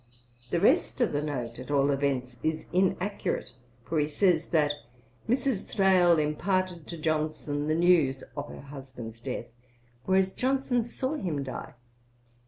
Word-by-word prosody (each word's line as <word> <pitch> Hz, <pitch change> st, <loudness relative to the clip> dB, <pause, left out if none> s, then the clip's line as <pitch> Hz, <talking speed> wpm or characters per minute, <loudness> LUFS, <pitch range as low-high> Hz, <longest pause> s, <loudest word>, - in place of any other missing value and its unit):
The 170 Hz, -, +1 dB
rest 265 Hz, -, +3 dB
of 245 Hz, -, +2 dB
the 145 Hz, -, 0 dB
note, 125 Hz, -6 st, -4 dB
at 130 Hz, -, -8 dB
all 140 Hz, 0 st, +3 dB
events, 135 Hz, -3 st, -1 dB
is 160 Hz, 0 st, -1 dB
inaccurate, 185 Hz, -, 0 dB, 0.3 s
for 160 Hz, -, 0 dB
he 150 Hz, -, +2 dB
says 165 Hz, +1 st, +2 dB
that 150 Hz, -3 st, +3 dB, 0.6 s
'Mrs. 250 Hz, -4 st, +1 dB
Thrale 185 Hz, -4 st, +5 dB
imparted 175 Hz, +3 st, 0 dB
to 170 Hz, -, -6 dB
Johnson 155 Hz, -2 st, -1 dB
the 155 Hz, -, +2 dB
news 160 Hz, -6 st, +3 dB
[of 145 Hz, 0 st, -5 dB
her -, -, -9 dB
husband's 130 Hz, -5 st, -9 dB
death],' 120 Hz, -2 st, -5 dB, 0.5 s
whereas 190 Hz, 0 st, +3 dB
Johnson 260 Hz, -1 st, +1 dB
saw 260 Hz, +3 st, -2 dB
him 170 Hz, -, -2 dB
die. 130 Hz, -2 st, -7 dB
155 Hz, 145 wpm, -28 LUFS, 140-190 Hz, 0.6 s, Thrale